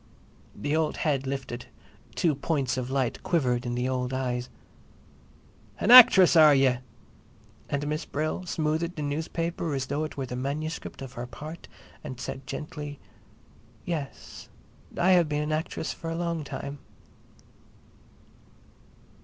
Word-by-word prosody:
The 145 +9 -1
old 160 -1 0
head 140 -3 +1
lifted; 130 -3 -5 0.5
two 165 -3 +2
points 140 -2 -1
of 130 -1 -3
light 130 -3 -1
quivered 125 -7 0
in 120 - -2
the 125 +1 -1
old 130 0 -1
eyes. 125 -2 -2 1.3
"An 225 - +2
actress—are 185 - +9
ye?" 135 -2 +3 0.9
And 140 +1 -1
Miss 150 +1 -2
Brill 155 +5 -2
smoothed 160 +2 -1
the 150 - -4
newspaper 160 +2 -2
as 135 -1 -2
though 145 +3 -2
it 155 - -6
were 135 - -2
the 125 - -6
manuscript 145 +3 -4
of 130 - -9
her 120 +1 -6
part 155 +6 -9 0.4
and 130 -5 -7
said 130 +1 -6
gently; 145 0 -6 0.9
"Yes, 155 -6 -6 0.5
I 185 +2 +4
have 175 -4 +4
been 150 0 0
an 150 - -3
actress 155 0 -2
for 165 - -7
a 165 - -3
long 170 -2 -2
time." 140 0 -6
145 Hz, 135 wpm, -27 LUFS, 130-160 Hz, 1.3 s, actress—are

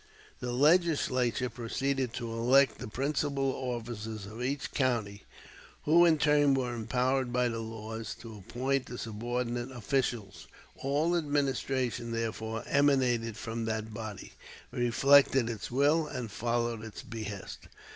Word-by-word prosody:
The 125 -1 -3
Legislature 135 -4 +3
proceeded 130 +2 -1
to 120 -3 -4
elect 125 +3 +4
the - - -5
principal 140 +2 0
officers 115 -4 -5
of 110 +4 -8
each 135 +3 -2
county, 115 -7 -1 0.6
who 170 +3 +6
in 165 -2 +5
turn 145 -1 +4
were 125 -2 -1
empowered 125 +2 0
by 125 0 +2
the 115 -1 -3
laws 110 0 -6
to 115 -2 -9
appoint 130 +7 -1
the 125 - -7
subordinate 120 +2 -3
officials. 120 -4 -2 0.3
All 150 +6 +1
administration, 135 -6 -1
therefore, 115 0 -3
emanated 125 -6 +2
from 115 0 -4
that 110 0 -3
body, 110 -3 -7 0.4
reflected 130 0 +4
its 110 -3 -6
will, 145 +5 +3
and 120 -6 -5
followed 120 0 -1
its 110 -2 -8
behest. 105 -3 -7
120 Hz, 125 wpm, -30 LUFS, 115-135 Hz, 0.6 s, who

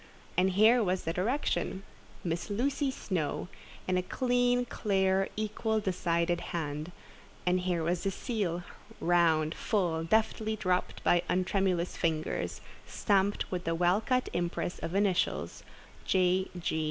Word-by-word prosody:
And 185 +1 +3
here 220 +5 +6
was 185 -1 0
the 165 - -2
direction, 195 -1 -1 0.4
"Miss 170 +4 -2
Lucy 270 +6 0
Snowe," 180 - -3 0.4
in 185 0 +2
a - - +1
clean, 245 +3 +1
clear, 195 -4 +1
equal, 215 +1 -1
decided 175 -3 0 0.2
hand; 150 +1 -4 0.5
and 180 +1 +3
here 180 -2 -1
was 170 +1 0
the 195 - 0
seal, 195 -5 -2 0.4
round, 165 -2 +3
full, 175 -7 0
deftly 220 +3 +1
dropped 185 -3 -1
by 175 - +4
untremulous 185 -1 +1
fingers, 160 -2 -1 0.3
stamped 200 -1 +1
with 180 -1 -2
the 165 0 0
well 180 +4 +3
cut 255 +2 +1
impress 175 0 -2
of 170 - -4
initials, 200 -3 0 0.4
"J. 185 0 +2
185 Hz, 130 wpm, -30 LUFS, 175-215 Hz, 0.5 s, here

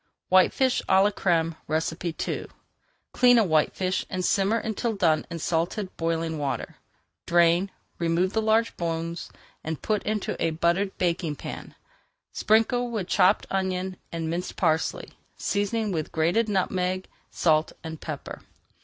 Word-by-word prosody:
WHITEFISH 215 +8 +4
À 190 0 +6
LA 205 - +3
CRÈME 165 -2 -1 0.2
II - - -12 0.6
Clean 245 -1 +5
a 225 - +5
whitefish 185 +2 +1
and 185 -2 -2
simmer 200 +5 +2
until 225 +1 -2
done 165 -6 +2
in 170 - -5
salted, 175 +4 -2
boiling 165 -1 -1
water. 140 -2 -3 0.5
Drain, 170 +2 +4 0.3
remove 170 +3 +1
the 220 - +1
large 220 +1 +2
bones. 165 0 -3 0.5
Put 215 -2 0
into 210 -1 -2
a - - +2
buttered 175 +4 +1
baking 170 -3 0
pan, - - -8 0.6
sprinkle 235 +3 +2
with 215 -6 -3
chopped 190 +3 +4
onion 190 -1 -1 0.2
and 165 -1 -3
minced 170 +3 -3
parsley, 160 +1 0 0.3
seasoning 205 +1 -1
with 160 -4 -3
grated 175 +8 +1
nutmeg, 185 -1 0 0.2
salt, 155 -2 +2
and 160 -1 -7
pepper. - - -6
180 Hz, 130 wpm, -26 LUFS, 165-205 Hz, 0.6 s, À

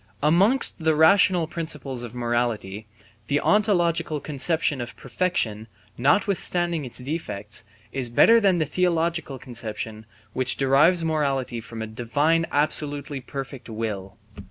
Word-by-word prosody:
Amongst 185 - +3
the 160 -1 +3
rational 175 +2 +5
principles 150 -6 -5
of 120 0 -6
morality, 120 -4 -2 0.4
the 145 +1 +1
ontological 175 -7 +1
conception 150 0 -1
of 120 - -7
perfection, 110 - -2 0.3
notwithstanding 175 - 0
its 125 - -6
defects, 120 -7 -4 0.3
is 130 -3 -2
better 230 - +6
than 195 -4 +3
the 160 - +1
theological 165 -3 -1
conception 110 -3 -7 0.3
which 130 -1 +1
derives 150 +6 +3
morality 135 -6 -1
from 115 0 -7
a - - -3
Divine 145 +9 0
absolutely 145 -1 +1
perfect 135 -2 -7
will. 105 -4 -5
145 Hz, 120 wpm, -24 LUFS, 120-165 Hz, 0.4 s, better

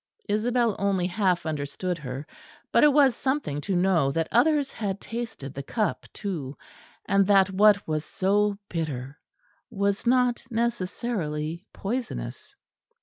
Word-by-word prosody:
Isabel 230 +1 +1
only 195 -2 +1
half 185 -1 +1
understood 160 +4 -3
her; 135 0 -6 0.5
but - - +5
it 300 - +7
was 275 -4 +5
something 265 - -1
to 190 +4 -2
know 175 -6 +3
that 165 +3 -1
others 285 +3 +3
had 200 -3 -3
tasted 225 - -6
the 140 - -5
cup 215 - -2
too; 155 -9 -5 0.5
and 195 -1 +3
that 195 -1 +5
what 205 +1 +4
was 155 -1 -1
so 200 +3 +1
bitter 145 -4 -4 0.5
was 200 +2 -1
not 250 -1 +3
necessarily 185 -7 -2
poisonous. 240 +5 -5
195 Hz, 130 wpm, -26 LUFS, 160-230 Hz, 0.5 s, it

